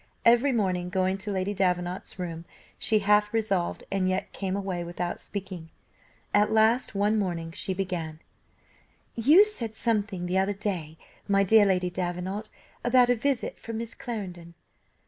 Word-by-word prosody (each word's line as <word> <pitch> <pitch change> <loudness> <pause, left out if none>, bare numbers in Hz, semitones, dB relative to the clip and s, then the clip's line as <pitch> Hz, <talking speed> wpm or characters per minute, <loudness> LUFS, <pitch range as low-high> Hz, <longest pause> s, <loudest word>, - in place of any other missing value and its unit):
Every 240 +4 +5
morning 185 -6 0
going 190 +1 0
to 205 +2 -4
Lady 190 +1 -1
Davenant's 180 -1 -1
room, 170 -2 -5 0.3
she 220 - +2
half 210 0 +4
resolved 200 -6 -1
and 190 -1 +1
yet 185 +1 -2
came 190 -1 -2
away 190 -3 -3
without 175 +1 -4
speaking. 185 -5 -7 0.6
At 210 +1 +4
last, 220 +1 +3
one 210 +2 +2
morning, 170 -4 -3
she 185 +3 -3
began: 175 -5 -3 0.9
"You 295 - +6
said 235 - -3
something 210 -6 0
the 180 +2 +1
other 195 +2 +1
day, 180 -7 -3 0.3
my 200 -1 +3
dear 205 +1 +6
Lady 180 -2 +1
Davenant, 185 +4 -3 0.3
about 245 0 +5
a - - +3
visit 260 +1 -1
from 230 -1 -6
Miss 230 +1 -5
Clarendon. 180 -8 -7
195 Hz, 150 wpm, -27 LUFS, 180-220 Hz, 0.9 s, You